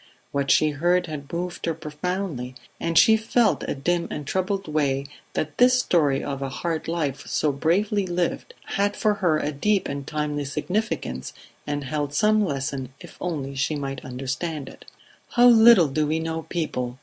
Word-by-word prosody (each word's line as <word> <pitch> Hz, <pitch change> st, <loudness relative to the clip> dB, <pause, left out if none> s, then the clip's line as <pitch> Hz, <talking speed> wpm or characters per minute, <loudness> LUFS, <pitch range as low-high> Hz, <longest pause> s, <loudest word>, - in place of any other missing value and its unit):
What 140 Hz, -1 st, -1 dB
she 155 Hz, +3 st, +4 dB
heard 175 Hz, +5 st, +2 dB
had 150 Hz, -4 st, -7 dB
moved 175 Hz, 0 st, -4 dB
her 165 Hz, -, 0 dB
profoundly, 150 Hz, -4 st, -4 dB, 0.2 s
and 165 Hz, -1 st, -1 dB
she 220 Hz, -, +7 dB
felt 225 Hz, +1 st, +2 dB
in -, -, -5 dB
a -, -, -1 dB
dim 170 Hz, +5 st, 0 dB
and 150 Hz, -, -5 dB
troubled 190 Hz, +4 st, -1 dB
way 140 Hz, -3 st, 0 dB, 0.3 s
that 155 Hz, -1 st, -3 dB
this 250 Hz, +1 st, +6 dB
story 150 Hz, -, +2 dB
of 140 Hz, -1 st, -4 dB
a 135 Hz, -, -2 dB
hard 160 Hz, +4 st, -3 dB
life 155 Hz, -5 st, -2 dB
so 150 Hz, -, +1 dB
bravely 190 Hz, +8 st, +1 dB
lived 175 Hz, -1 st, -2 dB
had 205 Hz, +1 st, 0 dB
for 215 Hz, -2 st, +2 dB
her 165 Hz, -4 st, +3 dB
a 150 Hz, 0 st, -1 dB
deep 195 Hz, +8 st, +1 dB
and 140 Hz, 0 st, -5 dB
timely 150 Hz, -1 st, -2 dB
significance 150 Hz, -, -3 dB, 0.3 s
and 145 Hz, -1 st, -2 dB
held 145 Hz, +1 st, -3 dB
some 215 Hz, +2 st, +4 dB
lesson 135 Hz, -5 st, -3 dB
if -, -, -12 dB
only 145 Hz, -6 st, -3 dB
she 140 Hz, +3 st, -1 dB
might 135 Hz, -2 st, -4 dB
understand 135 Hz, +4 st, -4 dB
it. -, -, -13 dB, 0.5 s
"How 245 Hz, -1 st, +5 dB
little 230 Hz, -7 st, +8 dB
do 150 Hz, +2 st, 0 dB
we 155 Hz, +2 st, +1 dB
know 160 Hz, 0 st, -4 dB
people!" 125 Hz, -7 st, -3 dB
155 Hz, 175 wpm, -24 LUFS, 140-180 Hz, 0.5 s, little